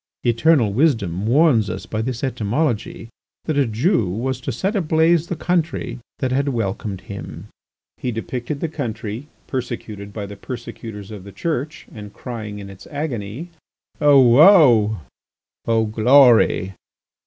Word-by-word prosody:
Eternal 120 Hz, -2 st, +3 dB
wisdom 105 Hz, -, +1 dB
warns 125 Hz, -, +3 dB
us 95 Hz, -, -5 dB
by 110 Hz, -, -3 dB
this 120 Hz, +1 st, -4 dB
etymology 120 Hz, -1 st, -2 dB, 0.4 s
that 155 Hz, -, -2 dB
a 140 Hz, -3 st, +2 dB
Jew 115 Hz, -, +1 dB
was 125 Hz, +7 st, -3 dB
to 135 Hz, -, -3 dB
set 190 Hz, -, -2 dB
ablaze 165 Hz, -2 st, +2 dB
the 175 Hz, -, -3 dB
country 160 Hz, -7 st, -2 dB, 0.2 s
that 130 Hz, -2 st, -2 dB
had 140 Hz, +2 st, +1 dB
welcomed 100 Hz, -5 st, -3 dB
him." 100 Hz, +1 st, -9 dB, 0.5 s
He 125 Hz, -, -3 dB
depicted 120 Hz, +5 st, -5 dB
the 165 Hz, -, 0 dB
country, 120 Hz, -4 st, -5 dB, 0.2 s
persecuted 115 Hz, -5 st, -5 dB
by 105 Hz, -1 st, -5 dB
the 100 Hz, 0 st, -9 dB
persecutors 110 Hz, -2 st, -8 dB
of 105 Hz, -3 st, -8 dB
the 100 Hz, -, -11 dB
Church, 155 Hz, -, -4 dB
and 105 Hz, -2 st, -9 dB
crying 110 Hz, -4 st, -7 dB
in 100 Hz, -1 st, -8 dB
its 95 Hz, -1 st, -13 dB
agony: 140 Hz, -, -5 dB, 0.5 s
"O 145 Hz, -2 st, +6 dB
woe! 125 Hz, -, +6 dB, 0.7 s
O 115 Hz, -1 st, +2 dB
glory! 115 Hz, -3 st, +4 dB
120 Hz, 140 wpm, -21 LUFS, 105-145 Hz, 0.7 s, O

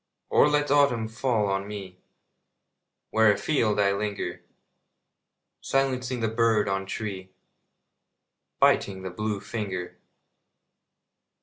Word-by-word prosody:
Or -, -, +5 dB
let 145 Hz, -1 st, +1 dB
autumn 140 Hz, -6 st, +3 dB
fall 110 Hz, -1 st, 0 dB
on 95 Hz, 0 st, -1 dB
me 95 Hz, -3 st, -8 dB, 1.1 s
Where 110 Hz, -1 st, +5 dB
afield 110 Hz, -1 st, +1 dB
I 100 Hz, -1 st, +3 dB
linger, 105 Hz, 0 st, -3 dB, 1.2 s
Silencing 130 Hz, -2 st, -1 dB
the 110 Hz, -, +1 dB
bird 110 Hz, -1 st, +2 dB
on 95 Hz, 0 st, -2 dB
tree, 95 Hz, -3 st, -5 dB, 1.3 s
Biting 95 Hz, -1 st, +2 dB
the 95 Hz, -, -5 dB
blue 105 Hz, +2 st, -3 dB
finger. 100 Hz, -3 st, -5 dB
105 Hz, 100 wpm, -26 LUFS, 100-120 Hz, 1.3 s, Or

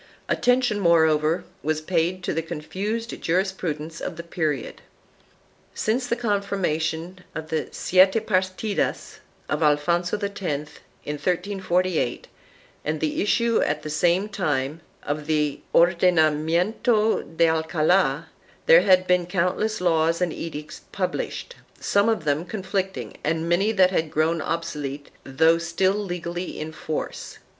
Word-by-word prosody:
1 -, -, +1 dB
Attention, 245 Hz, -4 st, +2 dB
moreover, 160 Hz, -2 st, +3 dB, 0.2 s
was 155 Hz, 0 st, 0 dB
paid 175 Hz, +2 st, -1 dB
to -, -, -1 dB
the 165 Hz, -, 0 dB
confused 195 Hz, +8 st, -4 dB
jurisprudence 165 Hz, -3 st, -2 dB
of 180 Hz, -, -4 dB
the 170 Hz, -, -7 dB
period. 155 Hz, -6 st, -3 dB, 0.9 s
Since 245 Hz, +4 st, 0 dB
the 235 Hz, -, +1 dB
confirmation 190 Hz, -6 st, -1 dB, 0.2 s
of 160 Hz, 0 st, -6 dB
the 160 Hz, -1 st, -1 dB
Siete 190 Hz, +4 st, +4 dB
Parlidas 190 Hz, +1 st, -1 dB, 0.3 s
of 155 Hz, -, -2 dB
Alfonso 170 Hz, +5 st, +2 dB
X, 200 Hz, 0 st, -5 dB
in 150 Hz, -1 st, -5 dB
1348, 180 Hz, -4 st, -1 dB, 0.6 s
and 155 Hz, +1 st, -2 dB
the 155 Hz, -1 st, -1 dB
issue 230 Hz, +3 st, +2 dB
at 150 Hz, 0 st, -1 dB
the 155 Hz, -, -5 dB
same 175 Hz, +6 st, +2 dB
time 155 Hz, -7 st, -2 dB, 0.2 s
of 150 Hz, +1 st, -3 dB
the 150 Hz, -2 st, 0 dB
Ordenamiento 170 Hz, -, +2 dB
de 170 Hz, -, +5 dB
Alcald, 160 Hz, -1 st, +2 dB, 0.4 s
there -, -, +8 dB
had 185 Hz, 0 st, +4 dB
been 180 Hz, -1 st, +2 dB
countless 190 Hz, +5 st, 0 dB
laws 165 Hz, -2 st, +2 dB
and 180 Hz, -3 st, 0 dB
edicts 155 Hz, -2 st, -7 dB
published, 485 Hz, -, -3 dB, 0.2 s
some 200 Hz, +2 st, +2 dB
of 220 Hz, -7 st, 0 dB
them 150 Hz, +1 st, 0 dB
conflicting 190 Hz, -1 st, -3 dB
and 160 Hz, +2 st, -1 dB
many 190 Hz, +5 st, +2 dB
that 190 Hz, -4 st, +4 dB
had 160 Hz, -4 st, 0 dB
grown 160 Hz, +2 st, +1 dB
obsolete 150 Hz, -4 st, -4 dB
though 160 Hz, +5 st, +3 dB
still 170 Hz, +3 st, +1 dB
legally 175 Hz, -3 st, -4 dB
in 155 Hz, +1 st, -5 dB
force. 155 Hz, 0 st, -5 dB
170 Hz, 130 wpm, -24 LUFS, 155-190 Hz, 0.9 s, there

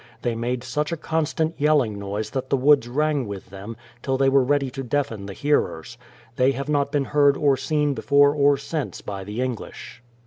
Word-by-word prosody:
They 120 Hz, -, 0 dB
made 120 Hz, +2 st, -2 dB
such 150 Hz, +5 st, -2 dB
a 170 Hz, -, -2 dB
constant 160 Hz, +1 st, -1 dB
yelling 140 Hz, -9 st, +2 dB
noise 100 Hz, +2 st, -4 dB
that 130 Hz, -1 st, -4 dB
the 140 Hz, -, +2 dB
woods 135 Hz, -1 st, +4 dB
rang 145 Hz, -1 st, 0 dB
with 100 Hz, -2 st, -8 dB
them, 100 Hz, +4 st, -8 dB, 0.2 s
till 135 Hz, -1 st, -1 dB
they 135 Hz, 0 st, +3 dB
were 135 Hz, 0 st, +4 dB
ready 140 Hz, 0 st, +1 dB
to 135 Hz, -, -5 dB
deafen 125 Hz, -6 st, -2 dB
the 100 Hz, -, -6 dB
hearers. 120 Hz, -, -1 dB, 0.4 s
They 130 Hz, +1 st, +3 dB
have 140 Hz, +2 st, -5 dB
not 145 Hz, -1 st, +1 dB
been 145 Hz, -2 st, 0 dB
heard 145 Hz, -1 st, +3 dB
or 140 Hz, -2 st, +3 dB
seen 150 Hz, +1 st, 0 dB
before 145 Hz, +1 st, +4 dB
or 145 Hz, -1 st, +3 dB
since 150 Hz, +2 st, -4 dB
by 100 Hz, -1 st, -6 dB
the 105 Hz, +5 st, -4 dB
English. 125 Hz, -1 st, -6 dB
135 Hz, 200 wpm, -23 LUFS, 115-145 Hz, 0.4 s, woods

